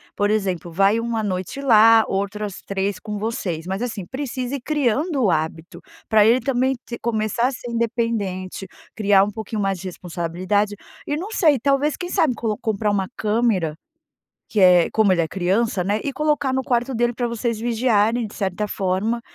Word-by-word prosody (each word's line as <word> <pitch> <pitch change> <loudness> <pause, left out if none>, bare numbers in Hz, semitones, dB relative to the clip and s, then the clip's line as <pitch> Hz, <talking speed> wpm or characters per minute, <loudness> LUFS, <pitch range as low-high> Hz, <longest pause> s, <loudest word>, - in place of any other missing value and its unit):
Por 205 0 +1
exemplo, 190 -5 -1
vai 195 +6 +3
uma 230 -1 -2
noite 190 +4 -3
lá, 225 -4 +6
outra 200 +2 -2
as 200 -3 -7
3 195 0 -2
com 210 -1 -6
vocês, 190 -7 -3
mas 190 +3 -3
assim, 225 -6 -4
precisa 260 +1 -4
ir 275 - -5
criando 290 +2 0
o 205 - +3
hábito, 165 +3 -3 0.3
pra 215 -2 +5
ele 235 +3 +5
também 260 +1 0
t 235 - -6
começar 220 +1 0
a - - -1
ser 245 -2 -7
independente 225 -6 -2 0.3
criar 200 -2 +4
um 205 - -4
pouquinho 220 0 -4
mais 195 -1 0
de 190 - -6
responsabilidade, 180 +4 -2 0.3
e 295 - -2
não 370 +6 -5
sei, 310 - +3
talvez 280 +4 +1
quem 355 - -5
sabe 310 -6 +2
colo 220 -2 -2
comprar 215 -1 -1
uma 195 -2 0
câmera, 210 -7 +1 0.7
que 215 - -1
é 180 -3 +6
como 215 -4 +3
ele 170 - +2
é 160 - -1
criança, 195 +2 0
né, 205 +4 0
e 280 - -2
colocar 295 -1 0
no 260 0 0
quarto 245 +1 0
dele 240 0 +1
pra 245 +1 -2
vocês 235 -1 -2
vigiarem 230 0 +1
de 205 - -13
certa 195 +1 -2
forma, 200 +5 -1
220 Hz, 185 wpm, -22 LUFS, 195-240 Hz, 0.7 s, lá